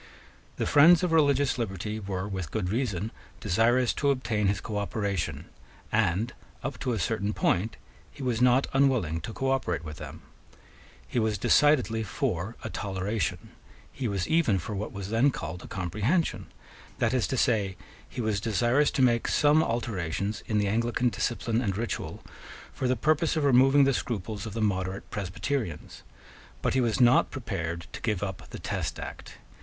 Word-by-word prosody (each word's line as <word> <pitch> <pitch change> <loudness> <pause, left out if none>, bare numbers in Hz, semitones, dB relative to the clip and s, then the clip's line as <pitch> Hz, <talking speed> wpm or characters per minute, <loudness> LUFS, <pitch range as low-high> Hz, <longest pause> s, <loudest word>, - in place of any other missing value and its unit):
The - - -1
friends 160 +4 +6
of 180 - +1
religious 140 -4 +3
liberty 105 0 -3
were 95 -1 -4
with 95 -6 -4
good 90 0 -2
reason 110 -4 -1 0.3
desirous 115 +5 +2
to 140 - +1
obtain 115 -6 0
his 100 0 +1
cooperation; 100 -2 -3 0.5
and, 105 +8 +1 0.3
up - - -4
to 125 - -1
a - - -1
certain 105 +2 -1
point, 110 +5 0 0.3
he 140 - -10
was 120 -2 0
not 125 +2 +5
unwilling 125 - +2
to 110 - -6
cooperate 130 -10 -1
with 75 0 -7
them. 75 +2 -9 0.8
He 90 - -1
was 110 -2 +1
decidedly 125 -1 +3
for 90 +1 -2
a - - -4
toleration. 100 +2 -3 0.4
He 130 -3 -3
was 100 -4 -1
even 160 -11 +3
for 95 +4 -5
what 100 +1 -4
was 100 0 -6
then 115 +5 +4
called 85 - -5
a - - -10
comprehension: 105 - -1 0.5
that - - +1
is 125 -3 +1
to 130 - -2
say, 100 -6 +1 0.3
he - - -4
was 110 -3 0
desirous 120 +7 +2
to 135 - +1
make 120 -2 +3
some 150 +1 +4
alterations 105 - -2
in 110 - 0
the 105 -1 +2
Anglican 115 +3 +1
discipline 115 0 -1
and 100 -5 -1
ritual 115 +1 -4 0.5
for 130 - -2
the 130 - +2
purpose 155 +6 +1
of 155 - 0
removing 135 +1 +6
the 135 0 +3
scruples 110 -2 -3
of 105 - -7
the 115 0 -1
moderate 95 -1 -1
Presbyterians. 105 - -4 0.6
But - - +1
he 130 - +3
was 115 -1 0
not 125 0 +5
prepared 85 -9 -4
to - - -7
give 105 -4 -1
up 95 -2 -5
the - - -7
Test - - -3
Act. - - -8
110 Hz, 170 wpm, -28 LUFS, 95-130 Hz, 0.8 s, friends